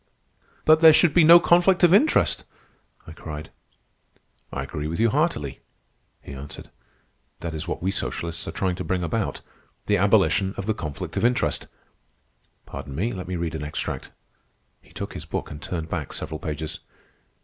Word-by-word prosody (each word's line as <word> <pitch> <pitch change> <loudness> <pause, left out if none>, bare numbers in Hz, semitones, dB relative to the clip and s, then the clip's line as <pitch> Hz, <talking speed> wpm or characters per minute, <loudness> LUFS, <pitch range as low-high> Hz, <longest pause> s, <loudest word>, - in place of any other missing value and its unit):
"But 155 +1 +6
there 160 -1 +9
should 155 -1 +4
be 175 - +6
no 170 +2 +9
conflict 175 +1 +4
of 175 0 +7
interest!" 290 +11 +3 0.6
I - - -10
cried. 75 -1 -8 1.0
"I - - -3
agree 75 0 -5
with 85 +2 -4
you 115 -1 +3
heartily," 145 - 0 0.6
he - - -9
answered. 70 +1 -10 0.7
"That 85 -1 -4
is 80 +1 -5
what - - -4
we 95 - +1
socialists 85 -3 -3
are - - -3
trying 95 +2 -1
to - - -4
bring 90 -1 -1
about,—the 105 +2 -3
abolition 95 -1 +3
of 95 - -4
the 110 - +1
conflict 75 -9 -6
of - - 0
interest. 120 +1 +1 1.0
Pardon 70 0 -8
me. 110 - -1
Let 95 -2 -6
me 90 - -3
read 85 -1 -3
an 80 -2 -4
extract." 75 +1 -4 0.7
He - - -23
took - - -6
his 75 - -7
book 80 - -4
and 75 -1 -8
turned 80 -2 -4
back 80 -4 -4
several 80 - -5
pages. 80 +1 -5
90 Hz, 170 wpm, -24 LUFS, 80-120 Hz, 1.0 s, there